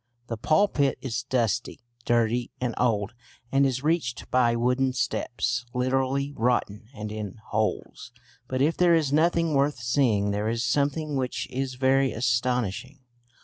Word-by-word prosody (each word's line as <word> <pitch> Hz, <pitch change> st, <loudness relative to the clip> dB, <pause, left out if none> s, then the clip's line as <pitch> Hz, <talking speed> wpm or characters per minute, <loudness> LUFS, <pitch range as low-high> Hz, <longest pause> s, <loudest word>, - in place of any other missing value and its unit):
The 115 Hz, -, -2 dB
pulpit 155 Hz, -, +2 dB
is 120 Hz, -2 st, -3 dB
dusty, 120 Hz, -3 st, -1 dB, 0.3 s
dirty 120 Hz, 0 st, +1 dB
and 125 Hz, -2 st, -1 dB
old, 105 Hz, -5 st, +1 dB, 0.4 s
and 135 Hz, 0 st, +4 dB
is 130 Hz, 0 st, -2 dB
reached 150 Hz, -7 st, -1 dB
by 120 Hz, -2 st, +3 dB
wooden 125 Hz, +2 st, +1 dB
steps 125 Hz, -1 st, -1 dB
literally 135 Hz, +2 st, 0 dB
rotten 110 Hz, -3 st, 0 dB
and 105 Hz, 0 st, -6 dB
in 105 Hz, -3 st, -5 dB
holes. 110 Hz, 0 st, -2 dB, 0.4 s
But 130 Hz, +1 st, 0 dB
if 160 Hz, +3 st, +2 dB
there 175 Hz, -1 st, +4 dB
is 150 Hz, -4 st, +1 dB
nothing 165 Hz, +1 st, +2 dB
worth 140 Hz, +1 st, +2 dB
seeing 115 Hz, -4 st, +1 dB
there 105 Hz, +2 st, -1 dB
is 115 Hz, +1 st, -1 dB
something 145 Hz, +4 st, 0 dB
which 130 Hz, -1 st, -2 dB
is 130 Hz, 0 st, -3 dB
very 135 Hz, +1 st, +2 dB
astonishing. 125 Hz, +2 st, -1 dB
125 Hz, 145 wpm, -26 LUFS, 115-140 Hz, 0.4 s, and